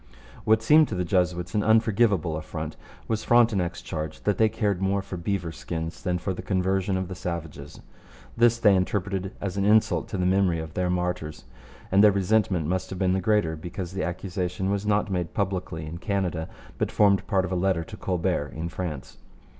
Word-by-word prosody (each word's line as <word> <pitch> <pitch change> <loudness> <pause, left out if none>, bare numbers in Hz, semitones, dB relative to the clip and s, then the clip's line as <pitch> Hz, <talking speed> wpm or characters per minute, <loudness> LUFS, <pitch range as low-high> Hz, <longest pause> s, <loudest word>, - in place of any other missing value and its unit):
What 110 0 +3
seemed 150 +5 +6
to 105 - -4
the 90 0 -1
Jesuits 90 0 0
an 105 - +2
unforgivable 110 -6 +3
affront 80 0 -5 0.3
was 110 -1 -1
Frontenac's 110 -8 +2
charge 75 0 -5
that 105 -3 0
they 110 -1 +5
cared 105 -4 -1
more 95 0 +1
for 95 - -7
beaver 90 -1 -2
skins 80 0 -5
than 90 -1 0
for 95 +2 -3
the - - -6
conversion 95 0 0
of 95 -1 -2
the 95 - -6
savages. 85 -6 -6 0.5
This 120 0 +4
they 105 -3 +5
interpreted 95 0 -1
as 100 -1 -4
an 100 - +1
insult 110 +1 +3
to 100 - -4
the 90 - 0
memory 95 -2 +2
of 80 -1 -6
their 90 0 0
martyrs, 90 -7 -2 0.5
and 100 +2 +5
their 105 - +8
resentment 100 -3 +1
must 95 +3 -2
have 95 - -6
been 95 0 +2
the 95 - 0
greater 105 -5 +1
because 85 +3 -6
the 95 - -2
accusation 90 +1 -2
was 100 +1 -2
not 105 -1 +1
made 90 -3 -2
publicly 90 -5 -2
in 80 +2 -7
Canada, 90 -5 -2 0.3
but - - 0
formed 100 -2 +3
part 95 -1 +2
of 95 - -6
a - - 0
letter 90 -2 +1
to - - -10
Colbert 90 -4 -1
in 80 +1 -4
France. 80 -7 -6
95 Hz, 195 wpm, -26 LUFS, 85-100 Hz, 0.5 s, their